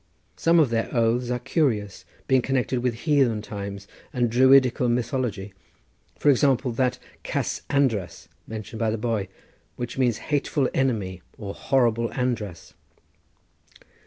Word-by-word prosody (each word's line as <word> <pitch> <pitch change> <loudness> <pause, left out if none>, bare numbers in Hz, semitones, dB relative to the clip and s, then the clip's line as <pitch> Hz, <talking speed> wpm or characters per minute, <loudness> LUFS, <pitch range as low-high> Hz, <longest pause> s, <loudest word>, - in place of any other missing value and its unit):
Some 165 +1 +3
of 145 -7 +3
their 115 0 0
oaths 120 +1 +1
are 125 - 0
curious, 115 - -1 0.2
being 130 -1 +4
connected 130 0 0
with 125 -2 0
heathen 135 -9 +2
times 100 -2 -7 0.2
and 120 -5 0
Druidical 130 0 +5
mythology; 120 -5 -2 0.6
for 145 - +4
example 135 -1 +2
that 125 +1 0 0.2
Cas - - -2
András 120 -10 0 0.2
mentioned 110 0 -7
by 115 -1 +1
the 110 - -1
boy, 110 -3 -1 0.5
which 120 +1 -5
means 120 -4 +2 0.2
hateful 140 -1 +1
enemy 105 -9 -1 0.2
or 100 -3 -6
horrible 115 -3 +1
András. 115 -8 -3
120 Hz, 130 wpm, -25 LUFS, 110-130 Hz, 0.6 s, Druidical